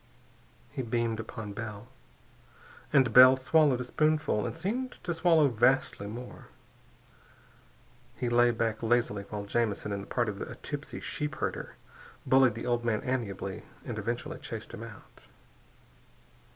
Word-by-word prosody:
_" - - -33 0.7
He 135 - -1
beamed 115 -2 -1
upon 110 -2 -6
Bell, 105 0 -7 1.0
and 130 -6 +4
Bell 130 +2 +9
swallowed 140 0 +3
a - - -2
spoonful 150 -5 +1
and - - -6
seemed 245 +9 -2
to 175 - -1
swallow 165 -2 +4
vastly 120 -3 +2
more. 120 +4 -9 1.7
He 125 - -2
lay 120 0 +4
back 115 -2 -1
lazily 115 -3 +1
while 105 -1 -5
Jamison 105 -1 -1
in 100 0 -2
the 100 - -10
part 120 -2 0
of 100 -2 -4
a - - -6
tipsy 145 0 -6
sheepherder 150 -1 -4 0.5
bullied 130 -4 +5
the 115 - -5
old 120 -1 0
man 115 -3 0
amiably 100 -7 -3 0.2
and 115 -3 -4
eventually 120 +3 -4
chased - - -7
him - - -7
out. 65 - -12
120 Hz, 140 wpm, -29 LUFS, 110-135 Hz, 1.7 s, Bell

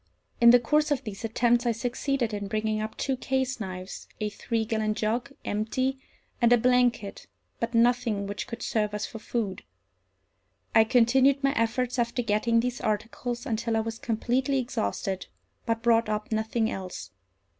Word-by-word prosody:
In 235 - +9
the 245 +1 +8
course 300 +6 +2
of 275 -3 0
these 210 -3 -7
attempts 240 +2 +2
I 235 - +3
succeeded 245 0 -1
in 205 -1 -3
bringing 215 +1 -1
up 215 0 -5
two 270 - 0
case 265 0 -1
knives, 185 -2 -6
a 215 - -1
three 225 +2 -2
gallon 215 -1 -1
jug, 230 +6 -1
empty, 255 +6 -1 0.4
and 235 0 +5
a 245 - +7
blanket, 245 -4 +1 0.3
but 230 0 -2
nothing 230 -3 +2
which 200 +1 -5
could 230 - -6
serve 210 -2 0
us 210 - -2
for 225 - -8
food. 215 -4 -3 1.1
I 220 - +6
continued 260 +4 +4
my 275 0 +3
efforts, 245 +1 0
after 240 +1 0
getting 230 +2 +2
these 250 +1 -3
articles, 230 +4 -2
until 225 -2 -1
I - - +2
was 225 0 -5
completely 250 +4 0
exhausted, 190 - -2 0.4
but 230 0 -1
brought 230 -2 +3
up 210 +1 -3
nothing 220 +1 0
else. 185 - -6
230 Hz, 165 wpm, -27 LUFS, 215-245 Hz, 1.1 s, In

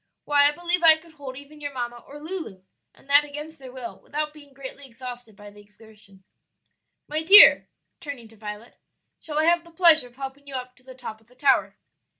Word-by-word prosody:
"Why, 285 -1 +4
I - - -2
believe 345 +3 +1
I 320 -2 +7
could 330 +1 -19
hold 275 -4 -10
even 290 +2 -13
your 285 -1 -6
mamma 240 -1 -5
or 290 +1 -12
Lulu, 310 - -5 0.3
and - - -24
that 285 +1 +6
against 295 +2 -10
their 260 -2 -12
will, 250 -2 -9
without 300 +1 -5
being 290 -2 -17
greatly 275 +1 -10
exhausted 245 -2 -10
by 205 0 -14
the 205 0 -17
exertion. 210 -2 -21 0.8
"My 305 +1 -3
dear," 390 +6 +8 0.3
turning 280 -6 -9
to 225 - -19
Violet, 210 +2 -10 0.4
"shall 300 -2 -7
I 310 - +2
have 340 0 +2
the 340 - -18
pleasure 325 -5 +5
of 240 - -23
helping 270 +1 -9
you 275 - -8
up 250 0 -7
to 255 - -25
the 260 0 -14
top 220 -3 -10
of 225 - -30
the 250 - -25
tower?" 280 +3 +1
275 Hz, 210 wpm, -23 LUFS, 240-305 Hz, 0.8 s, dear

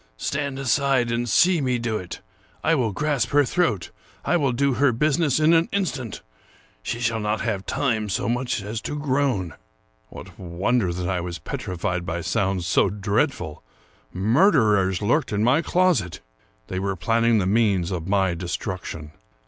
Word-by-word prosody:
stand 140 - -2
aside, 135 -2 +1
and 120 0 -1
see 170 - +4
me 125 -2 0
do 115 -2 -2
it. 90 -1 -8 0.4
I 165 - +3
will 125 -8 +1
grasp 145 +5 0
her 145 0 +4
throat; 125 - 0 0.3
I - - +2
will 140 -6 +2
do 135 +2 +1
her 135 +2 +3
business 150 +3 +1
in 155 +2 +4
an 165 0 +3
instant; 145 - -3 0.6
she 115 - -4
shall 115 -1 0
not 105 0 -1
have 105 -4 -3
time 110 -6 0
so 100 - -1
much 120 -2 -1
as 110 +2 -4
to 150 - -4
groan." 135 - 0 0.6
What - - -12
wonder 95 +3 0
that 90 +1 -3
I 90 -1 -1
was 85 0 -5
petrified 90 0 -3
by 85 0 -3
sounds 90 +2 -1
so 90 - +3
dreadful! 100 - -1 0.5
Murderers 105 - +3
lurked 130 +7 +1
in 105 0 0
my 130 +7 +4
closet. 155 - +1 0.5
They 95 - -4
were 95 0 -2
planning 115 +5 +2
the 100 - +1
means 100 -3 +2
of 85 -2 -4
my 95 -3 +2
destruction. 85 -3 -5
115 Hz, 165 wpm, -23 LUFS, 95-140 Hz, 0.6 s, see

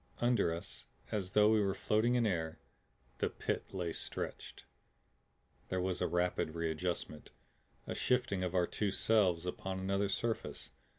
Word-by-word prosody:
Under 120 -8 +3
us, 85 +1 -6 0.3
as 95 -3 -2
though 105 0 +6
we 110 -1 +5
were 100 -1 +1
floating 115 +3 +2
in 120 -2 +3
air, 80 -6 -1 0.6
the - - +1
Pit - - -3
lay 90 -4 -2
stretched. - - -5 1.0
There 95 - 0
was 90 0 -1
a - - +2
rapid 90 -2 0
readjustment, 85 -1 -2 0.6
a - - -3
shifting 120 -7 +1
of 90 0 -2
our 90 -1 +4
two 105 +3 -1
selves 95 -4 +3
upon 95 +1 -3
another 100 +1 0
surface. 115 +3 -2
95 Hz, 145 wpm, -35 LUFS, 90-105 Hz, 1.0 s, though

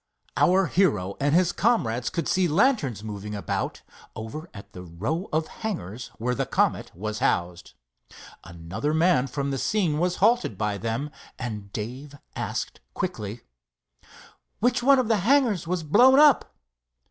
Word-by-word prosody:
Our 190 +1 +4
hero 105 - +1
and 145 +2 +2
his 175 0 +3
comrades 125 - +1
could 170 - -3
see 185 -1 +2
lanterns 155 - +1
moving 105 -1 -6
about 100 - -3 0.3
over 150 +10 -7
at 100 0 -12
the 90 - -8
row 110 - -4
of 155 +1 +1 0.2
hangars 125 - -4
where 125 +3 -1
the - - -2
Comet - - 0
was 105 +4 -4
housed. 85 0 -1 0.7
Another 85 - -4
man 160 -6 +3
from 140 +2 -3
the 135 - -2
scene 175 - 0
was 180 +1 +1
halted 225 - +2
by 105 -1 -2
them, 115 +8 -3 0.3
and 105 -4 -6
Dave 130 +8 -6 0.2
asked - - -4 0.2
quickly: 105 +2 -4 1.2
"Which 245 +3 +1
one 275 +2 +5
of 255 -3 +1
the 225 -1 +3
hangars 220 - +2
was 180 -1 -1
blown 250 - +6
up?" 295 -3 +5
145 Hz, 145 wpm, -25 LUFS, -, 1.2 s, blown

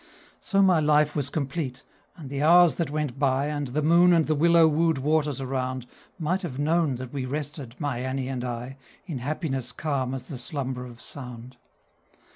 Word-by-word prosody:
So 195 -1 +2
my 185 -4 +5
life 150 0 +3
was 140 -2 -1
complete, 140 -3 -3 0.3
and 145 -6 -9
the 140 0 -2
hours 170 +2 +6
that 165 -5 -2
went 145 -3 -3
by, 135 -1 +2
And 145 -2 -2
the 145 +5 -2
moon 170 +3 +6
and 165 -2 +4
the 155 - +1
willow 165 +2 +5
wooed 160 0 +2
waters 145 0 +1
around, 130 -1 -3 0.3
Might 180 +3 -1
have 155 -9 -5
known 155 -1 +1
that 125 +1 -8
we 135 -2 -3
rested, 145 -3 -5
my 145 -5 -2
Annie 130 +1 -2
and 130 -2 -3
I, 125 +2 -5 0.3
In 160 -9 -5
happiness 135 -2 -2
calm 135 -4 -2
as 130 -1 -7
the 135 -6 -7
slumber 125 -1 -4
of 120 -1 -13
sound. 125 -2 -7
145 Hz, 185 wpm, -26 LUFS, 130-155 Hz, 0.3 s, hours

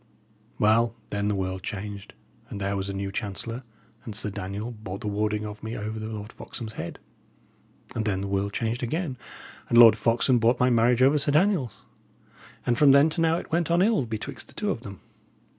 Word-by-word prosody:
Well, 115 +2 +3 0.2
then 100 0 -1
the 105 - +1
world 95 -1 -3
changed, 100 +1 -6 0.3
and 100 - -6
there 100 0 -1
was 100 0 -3
a - - -3
new 95 0 -3
chancellor, 115 +3 -4 0.4
and 110 - -7
Sir 105 -1 -2
Daniel 100 +3 -5
bought 100 -4 -7
the - - -4
warding 105 +1 -1
of 105 0 -7
me 110 +1 -5
over 110 +1 -4
the 110 - -5
Lord 105 -1 -7
Foxham's 110 -2 -7
head. - - -6 1.0
And 115 - -1
then 95 -3 0
the 100 - -3
world 100 +1 -1
changed 115 +3 -2
again, 145 +3 -2 0.5
and 120 - +3
Lord 115 -3 +10
Foxham 120 +3 +2
bought 120 +2 +3
my 125 0 +4
marriage 120 +2 +4
over 140 +3 +5
Sir 140 0 +1
Daniel's; 155 - +2 0.9
and 120 -1 +1
from 145 -2 +7
then 140 +3 +6
to 165 - -2
now 165 0 +3
it - - -7
went 170 0 +1
on 170 +2 +4
ill 210 - +2
betwixt 115 +5 -6
the - - -15
two 210 -1 -1
of 115 - -4
them. 100 -6 -10
110 Hz, 205 wpm, -26 LUFS, 105-125 Hz, 1.0 s, Lord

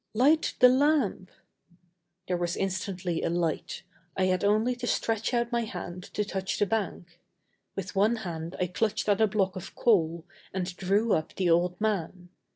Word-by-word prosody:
"Light 290 +7 +3
the 250 - +8
lamp!" 260 -8 +2 1.0
There 180 - 0
was 175 0 -2
instantly 185 -2 -2
a - - 0
light. 170 -1 -2 0.3
I 190 - +2
had 185 -1 +1
only 215 +5 +2
to 245 0 -4
stretch 225 -1 0
out 235 -1 0
my 235 0 +1
hand 180 -4 -6
to 210 - 0
touch 190 -2 -3
the 205 - +3
bank. 185 -4 -3 0.6
With 195 0 -5
one 210 +4 +3
hand 170 -5 -5
I 180 - +2
clutched 215 +5 -1
at 205 +1 +3
a 220 - +6
block 195 -2 0
of 185 - -8
coal 170 -7 +2 0.3
and 180 -1 -3
drew 200 +4 +1
up 155 - -1
the 180 -3 +1
old 175 +1 +2
man. 190 -4 -2
195 Hz, 170 wpm, -28 LUFS, 180-220 Hz, 1.0 s, the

